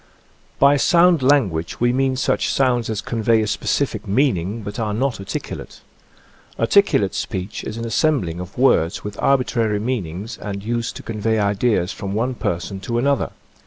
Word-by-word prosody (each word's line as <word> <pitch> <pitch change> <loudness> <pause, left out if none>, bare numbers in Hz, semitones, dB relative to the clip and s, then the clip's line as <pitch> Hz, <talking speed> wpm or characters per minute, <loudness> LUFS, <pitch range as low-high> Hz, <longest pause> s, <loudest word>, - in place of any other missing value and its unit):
By 140 +1 +5
sound 170 +1 +4
language 110 - +1
we 120 +1 +2
mean 135 0 +1
such 130 - 0
sounds 125 -4 +1
as 110 -2 -2
convey 115 -1 +1
a - - -1
specific 105 - -1
meaning, 105 - 0
but 105 +2 -6
are 105 -2 -1
not 130 +1 0
articu 100 - -5
late. - - -12 0.8
Articulate 115 - +3
speech 95 -1 -4
is 110 - -5
an 115 - -4
assembling 115 - 0
of 90 +1 -8
words 105 -9 +2
with 105 0 -6
arbitrary 120 -5 +2
meanings 105 -2 -4
and 100 -2 -5
used 115 +1 -2
to - - -8
convey 110 0 -1
ideas 100 -2 +1
from 100 -1 -5
one 125 +4 0
person 95 -3 -3
to 115 +4 -3
another. 140 +2 +1
115 Hz, 160 wpm, -21 LUFS, 100-130 Hz, 0.8 s, By